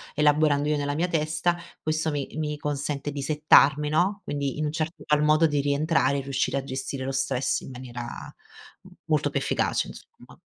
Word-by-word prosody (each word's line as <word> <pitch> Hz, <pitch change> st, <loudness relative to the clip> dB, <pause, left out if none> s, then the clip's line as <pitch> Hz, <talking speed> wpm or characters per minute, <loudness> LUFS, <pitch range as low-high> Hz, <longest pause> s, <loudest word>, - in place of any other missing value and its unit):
elaborando 150 Hz, -1 st, +3 dB
io 150 Hz, -, +2 dB
nella 145 Hz, 0 st, -2 dB
mia 175 Hz, +4 st, 0 dB
testa, 165 Hz, +2 st, 0 dB, 0.2 s
questo 155 Hz, 0 st, 0 dB
mi 145 Hz, -2 st, -3 dB
mi 150 Hz, -1 st, -2 dB
consente 145 Hz, -1 st, -3 dB
di 140 Hz, -, -5 dB
settarmi 150 Hz, 0 st, +4 dB
no, 185 Hz, +7 st, +1 dB
quindi 140 Hz, -2 st, -3 dB
in -, -, 0 dB
un 150 Hz, -, -1 dB
certo 160 Hz, +1 st, -4 dB
qual 150 Hz, 0 st, +3 dB
modo 155 Hz, +2 st, +4 dB
di 145 Hz, -2 st, +1 dB
rientrare 140 Hz, 0 st, +1 dB
e -, -, -3 dB
riuscire 135 Hz, 0 st, -1 dB
a 135 Hz, -, -2 dB
gestire 130 Hz, 0 st, -4 dB
lo 135 Hz, -, -2 dB
stress 135 Hz, -1 st, 0 dB
in -, -, -10 dB
maniera 125 Hz, -1 st, -7 dB, 0.8 s
m -, -, -15 dB, 0.2 s
molto -, -, +2 dB
più -, -, -1 dB
efficace -, -, 0 dB
insomma. -, -, -15 dB
150 Hz, 190 wpm, -26 LUFS, 140-155 Hz, 0.8 s, settarmi